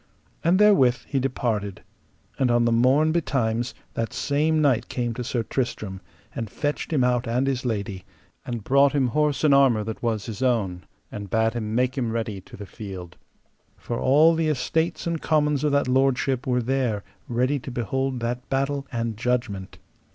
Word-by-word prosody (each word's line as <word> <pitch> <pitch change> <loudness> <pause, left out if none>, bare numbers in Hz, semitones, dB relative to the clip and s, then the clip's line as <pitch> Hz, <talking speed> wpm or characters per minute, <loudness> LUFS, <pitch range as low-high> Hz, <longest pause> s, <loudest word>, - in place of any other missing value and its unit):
And 170 +3 +4
therewith 165 -13 +5
he 140 - -1
departed, 115 -7 -2 0.6
and 130 -2 +3
on 120 0 +3
the 115 - +2
morn 130 +7 +4
betimes 120 -8 0 0.2
that 115 0 -3
same 145 +4 +1
knight 125 -6 +2
came 120 -2 -2
to 125 - -4
Sir 120 0 -1
Tristram, 110 -6 -3 0.3
and 115 -2 -4
fetched 145 +9 -3
him 140 -5 +2
out 125 0 +1
and 125 +3 +1
his 135 -2 -1
lady, 100 -5 -3 0.4
and 120 -3 -5
brought 140 +4 +4
him 135 -4 +2
horse 150 +1 0
and 150 -2 +5
armour 130 -6 +4
that 110 +1 -6
was 110 -3 -1
his 115 0 -6
own, 105 -9 0 0.3
and 100 -1 -7
bade 110 +2 +2
him 110 -2 -3
make 125 +2 +1
him 120 -3 -1
ready 110 -4 -3
to - - -13
the 100 - -7
field, 95 -4 -8 0.6
for 120 - -4
all 150 +5 +5
the 165 -1 0
estates 160 +3 -1
and 170 -2 -2
commons 150 -2 +1
of 150 - +2
that 140 -2 +2
lordship 130 0 +1
were 125 -1 +1
there 120 -5 0 0.3
ready 125 +4 +1
to 130 - -8
behold 130 +1 -2
that 120 +1 -3
battle 135 +1 -1
and 115 -3 -2
judgment. 120 -5 -2
125 Hz, 180 wpm, -24 LUFS, 115-140 Hz, 0.6 s, therewith